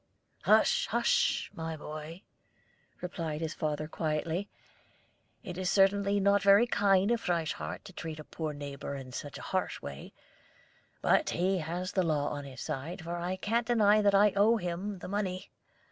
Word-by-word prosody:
"Hush, 485 +1 +4
hush, 485 +1 +1
my 160 -1 -5
boy!" 155 +4 -8 0.8
replied 165 -4 -4
his 160 -1 -2
father 155 -1 -2
quietly. 160 +4 -2 0.9
"It 180 0 -6
is 185 -1 0
certainly 200 +1 +3
not 200 +1 +4
very 200 +3 +6
kind 200 -2 +3
of 235 -1 +1
Frieshardt 170 -3 -2
to 195 - -12
treat 160 -3 -6
a - - -7
poor 155 0 -4
neighbor 140 -1 -6
in 130 -2 -8
such 140 +1 -6
a - - -9
harsh - - -1
way; 70 -1 -8 0.9
but - - +3
he 185 +2 +1
has 175 +4 -3
the 190 - +2
law 155 -4 +1
on 145 -1 -5
his 135 -2 -9
side, 160 +6 -5
for 170 +1 -4
I 175 +2 -2
can't 230 +4 -1
deny 215 -3 +4
that 200 -1 +4
I 205 0 +5
owe 215 +4 +5
him 185 +2 -3
the - - -8
money. 190 -1 -3
180 Hz, 165 wpm, -31 LUFS, 155-200 Hz, 0.9 s, very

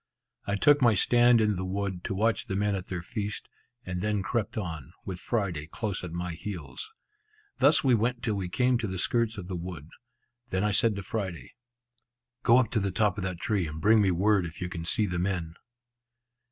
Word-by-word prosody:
I 100 - +1
took 145 +7 +5
my 120 -4 +5
stand 120 +4 +5
in 105 -3 +2
the 95 - -3
wood, 95 -1 -3
to 95 - -2
watch 110 +3 +1
the 95 - -2
men 105 +1 +1
at 95 -1 -4
their 90 -2 -4
feast, 105 0 -4 0.4
and 90 -1 -3
then 105 -1 0
crept 110 +2 -2
on, 80 - -5
with 95 -2 -5
Friday 90 -11 -2
close 100 +2 -4
at 90 - -5
my 85 +1 -3
heels. 100 - -7 0.7
Thus 145 +1 +5
we 130 -3 +4
went 120 +2 +1
till 115 -4 0
we 95 -3 -3
came 125 +4 +2
to 115 - -2
the 95 -1 -4
skirts 115 +3 0
of 90 -3 -6
the 95 - -4
wood. 85 -3 -7 0.6
Then 95 +1 0
I 105 - +2
said 110 +1 +2
to. 100 - -5
Friday, 95 - -4 0.9
"Go 120 +1 +5
up 125 -4 +2
to 115 - +2
the 100 -1 0
top 105 +3 +1
of - - -3
that 90 -2 -4
tree, 100 -5 0
and 80 0 -6
bring 110 +5 +5
me 100 - +3
word 95 +2 +3
if 80 - -9
you 90 - -3
can 85 -2 -5
see 110 +5 +2
the 90 -3 -2
men." 90 -3 -2
100 Hz, 215 wpm, -28 LUFS, 90-110 Hz, 0.9 s, took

